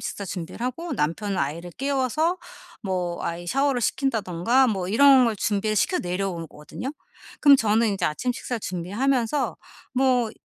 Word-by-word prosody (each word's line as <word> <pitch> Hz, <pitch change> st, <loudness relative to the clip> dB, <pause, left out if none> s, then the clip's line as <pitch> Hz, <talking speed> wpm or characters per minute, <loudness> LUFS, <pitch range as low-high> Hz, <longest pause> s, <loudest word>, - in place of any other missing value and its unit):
식사 200 Hz, -, -5 dB
준비를 180 Hz, +3 st, -6 dB
하고 330 Hz, +7 st, -4 dB
남편은 190 Hz, +7 st, -1 dB
아이를 165 Hz, +5 st, -3 dB
깨워서 275 Hz, -, 0 dB, 0.5 s
뭐 180 Hz, -3 st, -2 dB
아이 170 Hz, +1 st, -4 dB
샤워를 275 Hz, +2 st, +1 dB
시킨다든가 235 Hz, -1 st, +1 dB
뭐 190 Hz, -4 st, -1 dB
이런 265 Hz, +3 st, +6 dB
걸 230 Hz, -2 st, +1 dB
준비를 215 Hz, +1 st, 0 dB
시켜서 360 Hz, -, +1 dB
내려오 180 Hz, -1 st, -2 dB
오거든요. 160 Hz, -, -7 dB, 0.5 s
그럼 285 Hz, -2 st, +8 dB
저는 220 Hz, -1 st, +2 dB
이제 -, -, -2 dB
아침 245 Hz, +11 st, -1 dB
식사 245 Hz, -1 st, -4 dB
준비하면서 225 Hz, -, -1 dB, 0.4 s
뭐 250 Hz, -3 st, +2 dB
220 Hz, 345 characters per minute, -24 LUFS, 180-265 Hz, 0.5 s, 그럼